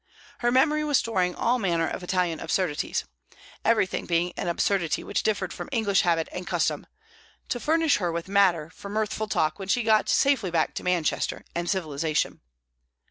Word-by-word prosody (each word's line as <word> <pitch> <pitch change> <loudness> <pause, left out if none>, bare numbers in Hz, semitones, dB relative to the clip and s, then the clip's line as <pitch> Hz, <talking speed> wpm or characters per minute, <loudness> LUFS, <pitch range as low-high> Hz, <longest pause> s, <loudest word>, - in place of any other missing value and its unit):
Her 240 0 +1
memory 300 +4 +3
was 295 -3 +3
storing 185 -6 0
all 245 +2 +1
manner 170 -5 +1
of - - -4
Italian 180 -3 0
absurdities 165 -2 -1 0.6
everything 220 -5 +1
being 175 +1 +1
an - - -4
absurdity 170 -1 0
which - - -1
differed 190 -5 -1
from - - -7
English 220 -6 +2
habit 165 -2 +1
and 180 0 -6
custom - - -1 0.6
to 245 - -1
furnish 320 +2 +2
her 175 -4 -1
with 170 +1 -4
matter 185 -6 +2
for 200 - -10
mirthful 215 +1 -2
talk 155 -3 0
when 195 - -6
she 240 +4 +1
got 220 -1 +3
safely 270 -9 +3
back 165 -2 0
to - - -5
Manchester 180 -3 -1
and 170 0 -2
civilization. 155 -4 -1
185 Hz, 170 wpm, -26 LUFS, 170-220 Hz, 0.6 s, memory